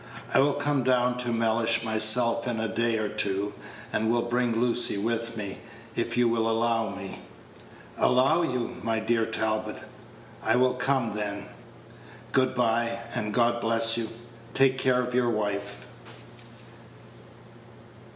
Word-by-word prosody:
I - - +5
will 140 +1 +3
come 145 -1 0
down 125 -1 +2
to 120 -1 -2
Mellish 115 0 +2
myself 115 +2 +2
in 120 -2 -1
a 110 - 0
day 115 +1 0
or 110 -1 -1
two, 100 -1 -2 0.4
and 110 +1 +1
will 120 0 +2
bring 120 -1 0
Lucy 120 -2 +1
with 115 +2 -2
me, 100 -2 -5 0.4
if - - -2
you 120 -1 +4
will 115 -1 +1
allow 115 -1 +1
me." 100 -1 -7 0.8
"Allow 135 +7 +4
you, 125 -7 -2
my 115 +1 0
dear 115 0 +1
Talbot!" 110 -1 -2 0.6
"I 110 - +2
will 125 +1 +3
come, 125 -3 0
then. 100 -1 -4 0.9
Good 130 -1 +2
by, 115 -1 +1 0.2
and 105 0 -2
God 120 +1 +2
bless 115 0 +2
you! 115 -1 -2 0.5
Take 130 -1 +3
care 125 -1 +2
of 125 0 -5
your 125 -1 +2
wife." 100 -2 -3
115 Hz, 140 wpm, -27 LUFS, 110-125 Hz, 0.9 s, I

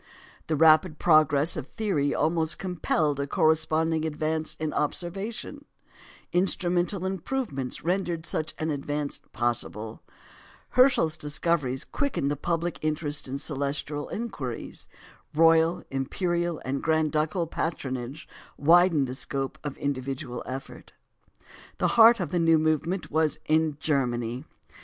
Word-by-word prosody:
The 160 - +1
rapid 155 +2 +5
progress 155 -1 +4
of 130 - -5
theory 180 -11 0
almost 160 +1 0
compelled 160 -5 0
a 140 - -1
corresponding 160 +1 +2
advance 155 0 -2
in 155 -1 -3
observation; 195 - -3 0.7
instrumental 180 +1 +1
improvements 190 - -3
rendered 175 -2 -1
such 155 0 -3
an 155 0 -1
advance 145 0 -3
possible; 115 -1 -2 0.7
Herschel's 250 - +4
discoveries 150 -3 -1
quickened 200 - -1
public 170 0 -1
interest 150 -2 -2
in 135 +1 -3
celestial 145 0 -3
inquiries; 150 - -5 0.5
royal, 165 +1 +4
imperial, 170 +5 -1
and 135 +2 -2
grand 160 -1 +1
ducal 155 +3 0
patronage 135 -4 -4 0.3
widened 165 -1 +5
the 125 - -5
scope 135 0 -4
of 145 -2 -5
individual 135 -2 -3
effort. 135 +3 -8 0.8
The - - +1
heart 230 -1 +7
of 175 -6 -3
the 175 - +1
new 165 -1 +5
movement 155 +4 0
was 155 0 +1
in 155 -1 +2
Germany. 125 -4 -1
155 Hz, 115 wpm, -27 LUFS, 140-175 Hz, 0.8 s, heart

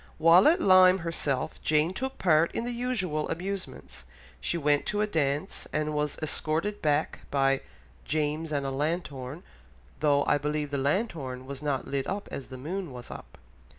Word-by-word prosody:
While 165 +4 +7
at 335 +4 +5
Lyme 185 - +7
herself, 155 -3 -2
Jane 155 +3 +2
took 265 +6 -4
part 165 -2 +3
in - - -1
the 245 - -3
usual 220 -11 -1
amusements; 185 - -5 0.3
she 170 - -1
went 145 -2 +2
to 210 0 0
a - - +3
dance 150 -2 -1
and 155 0 -1
was 150 -1 -1
escorted 160 +7 -1
back 150 0 +1
by 135 -1 +2 0.4
"James 155 +1 -1
and 140 -2 -1
a 135 - -2
lanthorn, 145 0 -3 0.6
though 145 -2 +3
I 145 - +3
believe 150 0 -2
the 140 - -1
lanthorn 140 - -1
was 140 +1 -7
not 145 -3 -2
lit 135 -1 -2 0.2
as 135 - -6
the 130 - -9
moon 170 +5 -4
was 125 -1 -9
up." - - -10
155 Hz, 165 wpm, -28 LUFS, 140-185 Hz, 0.6 s, While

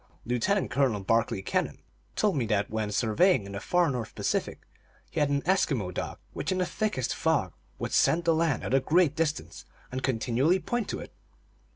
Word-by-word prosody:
Lieutenant 125 - 0
Colonel 120 -5 +1
Barclay 110 -1 +1
Kennan - - -1 0.4
told 210 -3 +2
me 125 -5 0
that 105 -2 0
when 110 -1 -1
surveying 115 - +3
in 100 - -8
the 100 - -4
far 175 - +2
North 120 -4 -5
Pacific - - -2 0.5
he - - -2
had 145 -1 +2
an 140 0 0
Eskimo 135 - +1
dog - - -4 0.2
which, - - -3
in 185 - 0
the 185 - +1
thickest 175 - -1
fog, 145 - 0 0.2
would - - -4
scent 170 +1 +3
the 165 - +4
land 160 -5 +1
at - - -3
a 135 - +6
great 155 +2 +3
distance, 155 - -2 0.3
and 130 +1 -3
continually 130 +7 +2
point 225 +5 -2
to - - -2
it. - - -9
135 Hz, 190 wpm, -28 LUFS, 110-170 Hz, 0.5 s, a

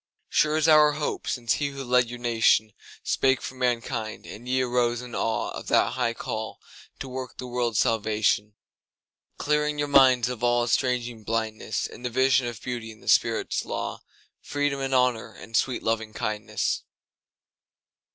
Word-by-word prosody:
Sure 155 0 +2
is 155 0 +2
our 150 -1 +6
hope 150 0 -3
since 120 -3 0
he 145 - +1
who 140 -1 -6
led 125 -1 +2
your 120 - -6
nationSpake 120 +2 +1
for - - -6
mankind, 120 -3 -2
and 120 +4 -9
ye 130 +1 +2
arose 120 -1 +1
in 125 0 -9
aweOf 115 -1 -2
that - - +3
high - - -1
call - - -5 0.4
to 135 - -6
work 130 -1 -6
the 125 - -6
world's 120 -3 -1
salvation; 105 -1 +1 0.8
Clearing 150 0 0
your 145 0 0
minds 130 -4 +5
of 125 -2 -5
all 120 0 +3
estranging 120 -2 0
blindnessIn 110 +1 -3
the 125 - -2
vision 130 0 +3
of 120 -3 -7
Beauty 120 -3 -4
and 110 - -16
the - - -16
Spirit's - - +2
law, - - -4 0.4
Freedom 145 -1 -1
and 135 -1 -1
Honour 125 -3 +1
and 115 - -10
sweet 130 +2 +1
Lovingkindness. 110 -1 -2
120 Hz, 150 wpm, -26 LUFS, 115-130 Hz, 0.8 s, our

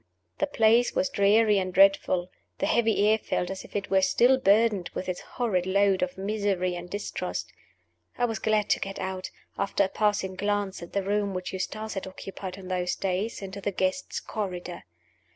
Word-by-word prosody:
The 295 - +1
place 230 -2 +3
was 185 - +1
dreary 205 +1 +4
and 185 -1 -2
dreadful; 185 -1 +4 0.3
the - - 0
heavy 225 -3 +3
air 220 +1 +4
felt 180 -3 -2
as 190 - -6
if - - -15
it 200 -2 -3
were 190 0 +5
still 250 +7 +4
burdened 210 -4 +3
with - - -4
its 180 -1 -2
horrid 190 -7 -1
load 195 0 +3
of 180 0 -2
misery 195 -2 -1
and 175 0 -7
distrust. 205 +2 -4 0.6
I 245 - +2
was 225 -2 -2
glad 215 -2 +1
to - - +3
get 195 0 -5
out 185 0 -4 0.3
(after 200 0 +1
a - - +1
passing 205 -3 0
glance 205 0 -1
at 170 - -10
the 200 - 0
room 200 0 0
which 185 +1 -4
Eustace 215 +3 -4
had 195 -1 -4
occupied 190 0 -7
in 190 -1 -10
those 180 -1 -1
days) 195 +3 -2
into 195 +1 -7
the 205 - -1
Guests' 190 +8 -1
Corridor. 180 -4 -5
195 Hz, 190 wpm, -27 LUFS, 185-210 Hz, 0.6 s, were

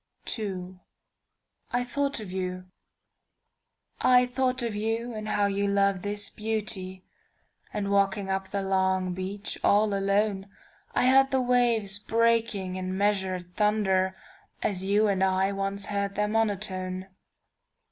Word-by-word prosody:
II. 185 -3 -5 0.9
"I 245 0 +1
THOUGHT 280 +2 -1
OF 200 -4 -8 1.7
YOU"I 250 0 +6
thought 255 0 0
of 230 -2 -2
you 225 +3 -2
and 215 -1 -5
how 205 -1 +2
you 200 0 0
love 200 -1 +2
this 205 +1 -1
beauty, 205 -4 -3 0.7
And 200 -1 -2
walking 200 0 +2
up 190 0 -2
the 200 0 -3
long 190 -1 +1
beach 195 +3 -5
all 205 0 +4
alone,I 200 +3 -1
heard 270 +1 +6
the 265 - +1
waves 240 -5 +2
breaking 225 -4 +1
in 185 0 -3
measured 190 -3 0
thunderAs 205 - -1
you 205 +2 +3
and 190 -2 +1
I 190 +1 +2
once 195 0 -2
heard 200 -1 -2
their 210 +1 +1
monotone. 195 -4 -1
200 Hz, 120 wpm, -27 LUFS, 190-220 Hz, 1.7 s, YOU"I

